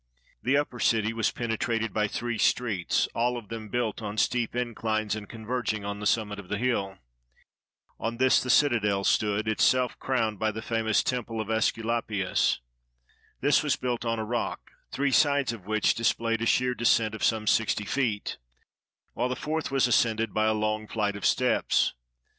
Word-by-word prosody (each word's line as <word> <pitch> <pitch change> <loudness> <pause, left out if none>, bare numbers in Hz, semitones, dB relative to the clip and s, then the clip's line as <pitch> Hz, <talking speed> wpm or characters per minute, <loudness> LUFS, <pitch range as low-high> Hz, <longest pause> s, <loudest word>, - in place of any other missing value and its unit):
The 135 +4 +2
upper 145 -4 -2
city 110 -1 +2
was 115 -2 +1
penetrated 115 -1 -2
by 105 -1 +1
three 120 +2 -3
streets, 110 -8 +1
all 120 +1 0
of 115 -4 -9
them 110 -2 -6
built 115 -1 -2
on 105 0 -5
steep 120 +1 0
inclines, 110 -3 -1
and 105 -2 -8
converging 110 -2 -3
on 100 0 -4
the 105 - -1
sum 110 -2 +1
mit 105 0 -6
of 95 - -11
the 105 - -1
hill. 100 -5 -1 1.0
On 115 +1 -3
this 130 +1 +4
the 130 - -5
citadel 110 -8 +3
stood, 105 +1 +1
itself 125 +4 +2
crowned 110 -6 -1
by 110 - +1
the 110 +1 -5
famous 110 -2 +1
Temple 120 -3 -2
of 110 -1 -4
^Esculapius. 110 -3 0 0.8
This 145 +1 +4
was 150 -2 +1
built 125 -2 -3
on 115 -1 -1
a 110 - -3
rock, 120 +1 -3 0.2
three 140 0 0
sides 140 -3 +3
of 100 -5 -11
which 110 0 +2
displayed 115 0 0
a 115 - 0
sheer 125 +1 +2
descent 115 -2 +2
of 110 - -6
some 110 -1 +1
sixty 105 -1 +1
feet, 110 -3 -2 0.7
while 125 - -1
the 125 - -1
fourth 155 +4 -3
was 135 -2 +2
ascended 115 -3 +2
by 110 0 +2
a 110 - +3
long 110 0 -1
flight 105 -2 -1
of 100 - 0
steps. - - +2
115 Hz, 175 wpm, -27 LUFS, 110-120 Hz, 1.0 s, this